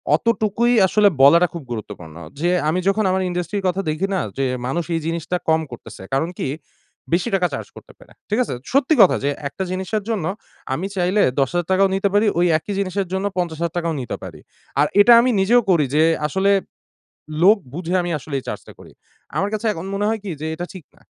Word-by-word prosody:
অতটুকুই 230 Hz, +1 st, +1 dB, 0.2 s
আসলে 210 Hz, +2 st, +4 dB
বলাটা 170 Hz, +6 st, +7 dB
খুব 170 Hz, -3 st, -6 dB
গুরুত্বপূর্ণ। 90 Hz, -8 st, -7 dB, 0.2 s
যে 175 Hz, +3 st, +1 dB, 0.2 s
আমি 170 Hz, +4 st, 0 dB
যখন 210 Hz, +2 st, +2 dB
আমার 190 Hz, 0 st, +1 dB
industry 175 Hz, +2 st, -3 dB
র -, -, -8 dB
কথা 185 Hz, +2 st, 0 dB
দেখি 155 Hz, +6 st, -1 dB
না? -, -, +1 dB, 0.2 s
যে, 135 Hz, -, +1 dB, 0.2 s
মানুষ 170 Hz, +6 st, -1 dB
এই 165 Hz, -, -1 dB
জিনিসটা 165 Hz, +2 st, -2 dB
কম 160 Hz, 0 st, +3 dB
করতেছে, 115 Hz, -4 st, -10 dB
কারণ 140 Hz, +5 st, +1 dB
কি? -, -, -1 dB, 0.6 s
বেশি 170 Hz, +1 st, +1 dB
টাকা 180 Hz, -2 st, +2 dB
চার্জ -, -, -5 dB
করতে -, -, -14 dB
পারে, -, -, -18 dB, 0.2 s
ঠিক 210 Hz, +3 st, +1 dB
আছে? -, -, -5 dB, 0.2 s
সত্যি 275 Hz, +3 st, +3 dB
কথা 190 Hz, -, +6 dB
যে, 140 Hz, -, +1 dB, 0.2 s
একটা 190 Hz, -, -5 dB
জিনিসের 190 Hz, +3 st, -2 dB
জন্য 205 Hz, -8 st, -1 dB, 0.5 s
আমি 185 Hz, +8 st, -2 dB
চাইলে 185 Hz, +3 st, +1 dB, 0.2 s
১০,০০০ 165 Hz, +5 st, 0 dB
টাকাও 195 Hz, +1 st, +4 dB
নিতে 195 Hz, +1 st, +1 dB
পারি, 210 Hz, +2 st, +3 dB
ওই 175 Hz, -, +4 dB
একই 200 Hz, +6 st, -6 dB
জিনিসের 195 Hz, 0 st, -2 dB
জন্য 190 Hz, +1 st, -1 dB
৫০,০০০ 170 Hz, -1 st, -2 dB
টাকাও 170 Hz, -1 st, -1 dB
নিতে 125 Hz, -, -4 dB
পারি, -, -, -9 dB, 0.4 s
আর 150 Hz, -, +4 dB
এটা 235 Hz, +4 st, +7 dB
আমি 255 Hz, -, +2 dB
নিজেও 240 Hz, +5 st, +4 dB
করি 165 Hz, -6 st, +4 dB
যে, 155 Hz, -, +5 dB, 0.2 s
আসলে 190 Hz, +6 st, +1 dB, 0.9 s
লোক 205 Hz, +5 st, +7 dB, 0.2 s
বুঝে 175 Hz, +1 st, -3 dB
আমি 175 Hz, -, -3 dB
আসলে 145 Hz, +1 st, -8 dB
এই -, -, -21 dB
চার্জটা -, -, -7 dB
করি। -, -, -15 dB, 0.4 s
আমার 195 Hz, -, +1 dB
কাছে 215 Hz, +2 st, -3 dB
এখন 175 Hz, 0 st, -7 dB
মনে 200 Hz, +1 st, -1 dB
হয় 225 Hz, 0 st, 0 dB
কি? 195 Hz, -, -4 dB
যে 155 Hz, -, -3 dB
এটা 175 Hz, +2 st, -5 dB
ঠিক 175 Hz, -6 st, -10 dB
না। -, -, -24 dB
180 Hz, 205 wpm, -21 LUFS, 160-200 Hz, 0.9 s, বলাটা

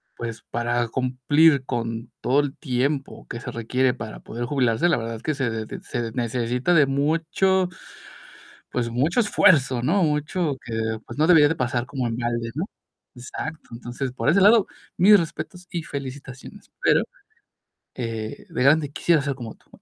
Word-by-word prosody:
pues, 115 Hz, -1 st, -6 dB
para 120 Hz, 0 st, 0 dB
cumplir 130 Hz, +4 st, +3 dB
con 115 Hz, -1 st, -4 dB
todo 135 Hz, +3 st, +3 dB
el 145 Hz, -1 st, -4 dB
tiempo 135 Hz, 0 st, -2 dB
que 115 Hz, -, -6 dB
se 130 Hz, -, -6 dB
requiere 125 Hz, +2 st, 0 dB
para 110 Hz, -4 st, -7 dB
poder 120 Hz, +2 st, -5 dB
jubilarse, 130 Hz, +3 st, +1 dB
la -, -, +3 dB
verdad 115 Hz, 0 st, -4 dB
es 110 Hz, -, -11 dB
que 155 Hz, -, 0 dB
se 135 Hz, -4 st, -1 dB
de 110 Hz, -1 st, -5 dB
se 120 Hz, -2 st, -4 dB
necesita 125 Hz, +6 st, 0 dB
de 150 Hz, -3 st, +6 dB
mucho 165 Hz, +7 st, +1 dB, 1.0 s
pues, 120 Hz, -2 st, -1 dB
mucho 140 Hz, -, +1 dB
esfuerzo, 140 Hz, -, +4 dB
¿no? 175 Hz, +10 st, +2 dB
Mucho 150 Hz, 0 st, 0 dB
que, 115 Hz, -, -5 dB, 0.3 s
pues, 120 Hz, -, -9 dB
no 155 Hz, -, +4 dB
debería 160 Hz, -4 st, +7 dB
de 160 Hz, -, 0 dB
pasar 125 Hz, -3 st, -1 dB
como 130 Hz, -2 st, -3 dB
en 115 Hz, -, -3 dB
balde, 120 Hz, -1 st, -2 dB
¿no? 160 Hz, -, -2 dB, 0.5 s
Exacto 145 Hz, +5 st, -7 dB
Entonces, 125 Hz, +2 st, -5 dB
por 115 Hz, -2 st, -2 dB
ese 180 Hz, +6 st, +5 dB
lado, 210 Hz, +1 st, +6 dB, 0.3 s
mis 205 Hz, +4 st, +7 dB
respetos 170 Hz, +1 st, -5 dB
y 170 Hz, -, -3 dB
felicitaciones, 135 Hz, -2 st, -8 dB
pero, -, -, +4 dB, 0.9 s
eh, 115 Hz, -3 st, -5 dB
de -, -, -2 dB
grande 145 Hz, +2 st, +4 dB
quisiera 160 Hz, +1 st, +2 dB
ser 140 Hz, 0 st, -2 dB
como 120 Hz, -4 st, -8 dB
tú. -, -, -32 dB
130 Hz, 165 wpm, -24 LUFS, 120-155 Hz, 1.0 s, debería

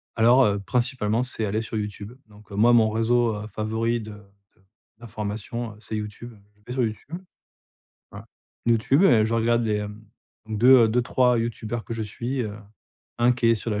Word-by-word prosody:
Alors, 120 Hz, +3 st, +5 dB
heu, 100 Hz, -1 st, +1 dB
principalement, 120 Hz, +1 st, -1 dB
c'est 125 Hz, -3 st, -4 dB
aller 105 Hz, +2 st, -1 dB
sur 110 Hz, -, -7 dB
YouTube. 105 Hz, +1 st, -6 dB
Donc, 105 Hz, -1 st, -19 dB
heu, -, -, -7 dB
moi 115 Hz, +4 st, +4 dB
mon 115 Hz, -2 st, +5 dB
réseau, 115 Hz, +1 st, +1 dB
heu, 105 Hz, +1 st, -6 dB
favori 110 Hz, +2 st, -2 dB
de 110 Hz, 0 st, -9 dB
de 100 Hz, 0 st, -18 dB, 0.4 s
d'information, 110 Hz, +1 st, -5 dB
heu, -, -, -17 dB
c'est 110 Hz, 0 st, -7 dB
YouTube. 105 Hz, +3 st, -7 dB, 0.2 s
Je 105 Hz, -, -31 dB
vais 125 Hz, -, -5 dB
sur 130 Hz, -1 st, 0 dB
YouTube 115 Hz, +9 st, -5 dB, 0.9 s
voilà, -, -, -10 dB, 0.4 s
YouTube 120 Hz, -, +3 dB
et 110 Hz, -, +5 dB
je 115 Hz, -, -1 dB
regarde 115 Hz, +1 st, +2 dB
les 110 Hz, -2 st, 0 dB
hem 105 Hz, +1 st, -6 dB, 0.5 s
2 120 Hz, +3 st, +6 dB
heu, -, -, +2 dB
2-3 125 Hz, +1 st, +2 dB
youtubeurs 115 Hz, 0 st, -4 dB
que -, -, -7 dB
je 115 Hz, -1 st, -3 dB
suis, 120 Hz, +5 st, -4 dB
heu, 105 Hz, -3 st, -5 dB, 0.6 s
1 120 Hz, +1 st, +4 dB
qui 125 Hz, -1 st, -1 dB
est 115 Hz, -, +5 dB
sur 115 Hz, +1 st, -4 dB
la 105 Hz, -1 st, -1 dB
110 Hz, 190 wpm, -24 LUFS, 105-120 Hz, 0.9 s, 2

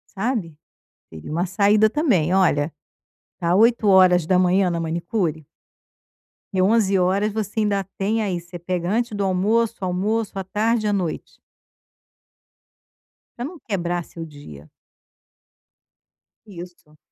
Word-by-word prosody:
sabe, 195 Hz, -, -2 dB, 0.5 s
teria 80 Hz, -, -10 dB
uma 170 Hz, +4 st, 0 dB
saída 205 Hz, +4 st, +3 dB
também, 210 Hz, -, +1 dB
olha, 165 Hz, -5 st, +2 dB, 0.7 s
tá 175 Hz, 0 st, +1 dB
8 225 Hz, 0 st, +3 dB
horas 180 Hz, -3 st, +5 dB
da 185 Hz, -, +3 dB
manhã 185 Hz, +1 st, +3 dB
na 170 Hz, -, -2 dB
manicure 165 Hz, -, -2 dB, 1.1 s
e 185 Hz, -, +1 dB
11 200 Hz, -1 st, +3 dB
horas 195 Hz, +4 st, +1 dB
você 215 Hz, 0 st, -3 dB
ainda 200 Hz, -2 st, 0 dB
tem 215 Hz, +3 st, 0 dB
aí 190 Hz, -5 st, -2 dB
você 175 Hz, +1 st, -10 dB
pega 175 Hz, 0 st, -3 dB
antes 235 Hz, +1 st, 0 dB
do 205 Hz, -1 st, -2 dB
almoço, 215 Hz, +5 st, +1 dB
almoço, 195 Hz, +3 st, -1 dB
à 195 Hz, -, -2 dB
tarde 215 Hz, +3 st, 0 dB
e -, -, +1 dB
à -, -, +1 dB
noite 180 Hz, -5 st, -4 dB, 2.0 s
pra 240 Hz, -, -4 dB
não 345 Hz, +4 st, -8 dB
quebrar 175 Hz, -5 st, -3 dB
seu 165 Hz, 0 st, -9 dB
dia. 80 Hz, -, -13 dB, 1.8 s
Isso. 175 Hz, -5 st, -12 dB
190 Hz, 130 wpm, -22 LUFS, 175-215 Hz, 2.0 s, horas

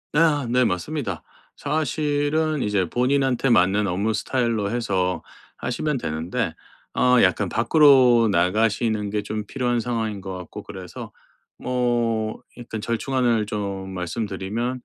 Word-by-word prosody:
예 -, -, +4 dB
아 150 Hz, -4 st, +3 dB
네 125 Hz, +2 st, +3 dB
맞습니다. 105 Hz, -, -2 dB, 0.3 s
사실은 150 Hz, 0 st, 0 dB
이제 100 Hz, -4 st, 0 dB
본인한테 130 Hz, +1 st, +1 dB
맞는 100 Hz, -1 st, +3 dB
업무 100 Hz, +5 st, 0 dB
스타일로 115 Hz, -2 st, 0 dB
해서 95 Hz, -6 st, -1 dB, 0.3 s
하시면 150 Hz, +4 st, -2 dB
되는데 85 Hz, +2 st, -2 dB, 0.4 s
어 125 Hz, -1 st, +4 dB
약간 95 Hz, +1 st, +2 dB
밖으로 125 Hz, -, +5 dB
나가시는 105 Hz, +3 st, +1 dB
게 105 Hz, 0 st, -2 dB
좀 105 Hz, 0 st, -4 dB
필요한 120 Hz, -1 st, 0 dB
상황인 110 Hz, -4 st, -2 dB
것 95 Hz, -1 st, -6 dB
같고 90 Hz, -2 st, -8 dB
그래서 90 Hz, -2 st, -9 dB, 0.5 s
뭐 120 Hz, -3 st, -1 dB, 0.2 s
약간 115 Hz, -2 st, -6 dB
절충안을 115 Hz, -1 st, 0 dB
좀 100 Hz, -2 st, -4 dB
말씀드리면 105 Hz, +6 st, -3 dB
115 Hz, 280 characters per minute, -23 LUFS, 100-125 Hz, 0.5 s, 밖으로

